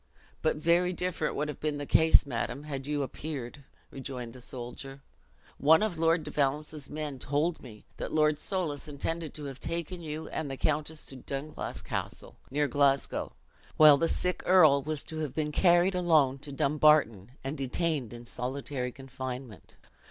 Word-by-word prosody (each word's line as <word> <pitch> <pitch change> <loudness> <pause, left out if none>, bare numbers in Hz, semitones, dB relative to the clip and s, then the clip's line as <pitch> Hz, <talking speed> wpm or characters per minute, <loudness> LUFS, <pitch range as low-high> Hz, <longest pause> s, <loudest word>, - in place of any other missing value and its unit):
"But 155 - +2
very 170 +4 +2
different 180 -4 -2
would 150 +2 -1
have 150 - -6
been 150 -1 -1
the 145 - -4
case, 160 +2 +5
madam, 140 +2 -3
had 140 -2 -5
you 145 -1 0
appeared," 140 -2 -6 0.3
rejoined 125 -3 -6
the 125 - -12
soldier. 130 +3 -8 0.6
"One 160 +6 +6
of 185 -7 -2
Lord 165 0 +3
de - - -7
Valence's 150 +1 -1
men 150 -3 -5
told 150 +6 0
me, 110 -5 -12
that - - -4
Lord 155 -1 +3
Soulis 160 -8 -2
intended 155 +2 -3
to 150 - -7
have 135 -2 -6
taken 170 +2 -4
you 155 0 -5
and 155 - -3
the 135 - -5
countess 155 +2 -1
to 135 - -7
Dunglass 140 +3 -5
Castle, - - -5
near 145 +2 +1
Glasgow, 140 0 +1 0.4
while 150 -2 +9
the 165 - +2
sick 180 0 -1
earl 155 -7 +6
was 150 +1 -3
to 160 - -7
have 150 -4 -3
been 150 -1 -1
carried 175 +3 +4
alone 155 -7 +3
to 145 +1 -5
Dumbarton, 140 -7 +3
and 135 +3 -3
detained 140 -2 -1
in 120 0 -9
solitary 125 +1 -4
confinement. 130 -3 -8
145 Hz, 165 wpm, -29 LUFS, 135-160 Hz, 0.6 s, while